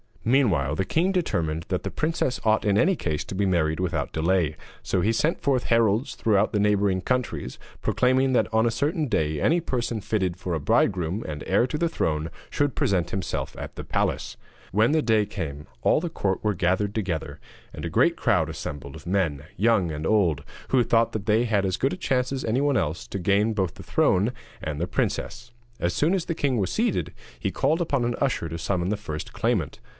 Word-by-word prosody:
Meanwhile 100 - +2
the 95 - 0
king 175 - +1
determined 85 - -1
that 90 - 0
the - - -4
princess 155 -5 -1
ought 110 0 +3
in 100 -1 +3
any 185 - +4
case 75 - -2
to - - -6
be 100 +1 +1
married 80 -4 +1
without 90 -2 -1
delay, 80 -1 +1 0.3
so 95 - 0
he 110 - +2
sent 150 +8 0
forth 135 -4 +1
heralds 115 +1 +2
throughout 105 -2 +2
the 105 - +2
neighbouring 100 -2 +2
countries, 125 - -2 0.2
proclaiming 130 +1 +2
that 120 - +2
on 110 +1 +4
a - - +1
certain 150 +5 0
day 80 - 0
any 170 - +3
person 120 -7 -2
fitted 95 -4 -1
for 90 -1 -4
a 80 - 0
bridegroom 90 +6 +1
and 75 -1 -5
heir 100 +5 +3
to 150 - -3
the 170 +1 +1
throne 80 - -1 0.2
should 145 -4 0
present 90 -4 +1
himself 95 - -3
at - - -7
the - - -6
palace. - - -1 0.3
When 110 +7 +3
the 160 0 +3
day 110 -5 +3
came, 75 -7 -5 0.2
all - - +4
the 175 +2 -3
court 95 - -2
were 105 -2 +1
gathered 95 +3 +1
together, 90 -8 -3 0.3
and - - -7
a - - -2
great - - +3
crowd - - +2
assembled 70 -1 -6
of - - -11
men, 80 -7 0
young 100 -4 +3
and 75 +1 -4
old, 85 -9 +2 0.3
who 130 -2 +4
thought 115 0 +2
that 105 -2 -3
they 110 +3 +3
had 105 -4 +1
as 95 0 0
good 135 - +1
a - - -5
chance 130 -7 0
as 135 -1 -3
anyone 135 +4 +2
else 80 +3 -2
to 100 - -4
gain 100 +4 +2
both 95 -5 -1
the - - -11
throne 100 +6 +2 0.3
and 75 -1 -3
the 85 - -1
princess. 120 +5 -2 0.3
As 85 - 0
soon 160 +5 +2
as 185 -4 0
the 170 - -2
king 135 -5 0
was 95 -4 0
seated, - - 0 0.3
he - - -1
called 160 +3 +1
upon 140 -7 0
an 120 0 0
usher 135 -11 0
to 80 - -4
summon 90 +1 -1
the 105 - 0
first 80 -7 -6
claimant. - - -1
105 Hz, 210 wpm, -25 LUFS, 85-125 Hz, 0.3 s, any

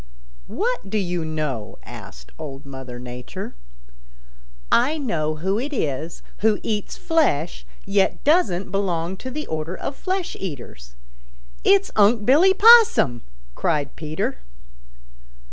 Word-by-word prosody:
"What 420 - -2
do 215 - 0
you 180 -4 -1
know?" 150 -8 -3
asked - - -11
Old 140 -3 -7
Mother 130 -2 -8
Nature. 125 0 -7 1.2
"I 270 +7 +3
know 155 - -1
who 190 +7 -1
it 280 +5 -3
is 155 - -3 0.2
who 215 -1 +2
eats 210 -2 -3
flesh, 225 - 0 0.2
yet 195 0 +1
doesn't 225 - +2
belong 185 -3 -1
to 260 - -6
the 300 +4 -5
order 160 +3 -4
of 275 - -5
flesh 375 +1 -3
eaters. 120 - -8 0.7
It's 200 0 +4
Unc' 210 +1 +4
Billy 340 +9 +5
Possum!" 445 - +6 0.3
cried 150 - -1
Peter. 155 - -3
190 Hz, 120 wpm, -23 LUFS, -, 1.2 s, Possum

